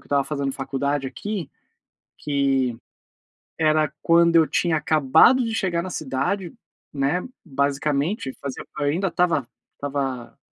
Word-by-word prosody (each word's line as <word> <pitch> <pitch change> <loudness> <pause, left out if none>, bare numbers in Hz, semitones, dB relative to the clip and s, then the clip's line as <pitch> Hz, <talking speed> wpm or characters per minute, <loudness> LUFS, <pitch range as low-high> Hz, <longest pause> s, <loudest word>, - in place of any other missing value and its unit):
que - - -23
eu - - -22
estava 140 -1 +2
fazendo 140 -2 -2
faculdade 135 +1 -2
aqui, 180 +4 -5 0.7
que 135 -4 0 0.8
era 155 -2 +2
quando 170 0 +4
eu 165 -1 +7
tinha 170 -2 +1
acabado 155 - +4
de 225 -1 -2
chegar 185 -6 0
na 185 - -5
cidade, 155 +5 -2 0.4
né, 145 +6 0 0.2
basicamente, 140 - -1
fazia 140 -2 -6
eu 145 - 0
ainda 170 +7 +1
estava 170 -6 +1 0.3
estava 135 -4 -4
145 Hz, 130 wpm, -23 LUFS, 135-170 Hz, 0.8 s, eu